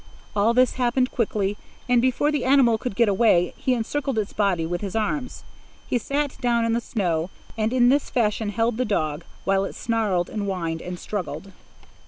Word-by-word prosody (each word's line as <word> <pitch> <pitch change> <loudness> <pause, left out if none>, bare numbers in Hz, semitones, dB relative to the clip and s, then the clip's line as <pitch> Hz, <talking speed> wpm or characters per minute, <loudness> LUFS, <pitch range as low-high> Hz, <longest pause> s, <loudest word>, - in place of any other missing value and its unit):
All 215 +3 +3
this 255 0 +3
happened 250 +1 +2
quickly, 210 -3 -1 0.3
and 245 -1 +4
before 260 +4 +2
the 295 -3 -1
animal 255 -4 +4
could 250 -4 -4
get 235 +1 +4
away, 195 -4 +3
he 255 - 0
encircled 265 +2 -2
its 210 -2 -2
body 195 -6 +1
with 175 +2 -3
his 200 -1 -5
arms. 250 +5 -2 0.4
He 245 - +1
sat 285 +3 -2
down 235 -2 +2
in 230 - +1
the 235 - 0
snow, 175 -8 -1 0.3
and 220 0 0
in 245 -1 +4
this 285 +2 +2
fashion 215 -2 0
held 225 +2 0
the 255 - +1
dog, 155 -8 -1 0.2
while 195 0 +2
it 195 - -5
snarled 210 -6 0
and 210 -2 -4
whined 165 -4 -2
and 180 0 -6
struggled. 185 -1 -5
220 Hz, 190 wpm, -24 LUFS, 195-245 Hz, 0.4 s, and